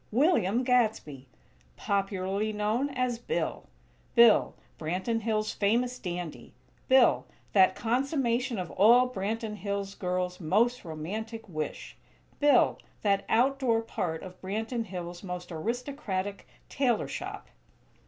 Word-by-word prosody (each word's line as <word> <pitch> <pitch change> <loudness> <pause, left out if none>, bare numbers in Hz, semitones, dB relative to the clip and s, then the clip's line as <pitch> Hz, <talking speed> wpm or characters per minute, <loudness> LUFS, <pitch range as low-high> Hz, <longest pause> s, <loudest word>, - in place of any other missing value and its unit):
William 240 - +3
Gadsby! 220 - 0 0.5
Popularly 195 +1 -1
known 215 +6 0
as 255 -3 -1
Bill! 470 - -3 0.5
Bill, 235 -3 +6 0.2
Branton 185 +8 -1
Hills' 215 -1 -1
famous 245 +5 +1
dandy; 175 -3 -6 0.3
Bill, 260 -2 +5 0.3
that 190 -2 +5
consummation 250 0 0
of 180 -3 -4
all 240 +6 +6
Branton 220 -1 -3
Hills 200 -1 -3
girls' 180 -1 -2
most 225 +9 +1
romantic 215 +9 -6
wish; 155 -4 -5 0.4
Bill, 290 -3 +4 0.2
that 200 -1 +2
"outdoor 245 -1 +2
part" 165 -7 -3
of 185 -1 -11
Branton 225 +5 -3
Hills' 175 -2 -6
most 180 -2 -6
aristocratic 205 - -3 0.2
tailor 250 -5 +1
shop! - - -6
215 Hz, 110 wpm, -29 LUFS, 185-245 Hz, 0.5 s, Bill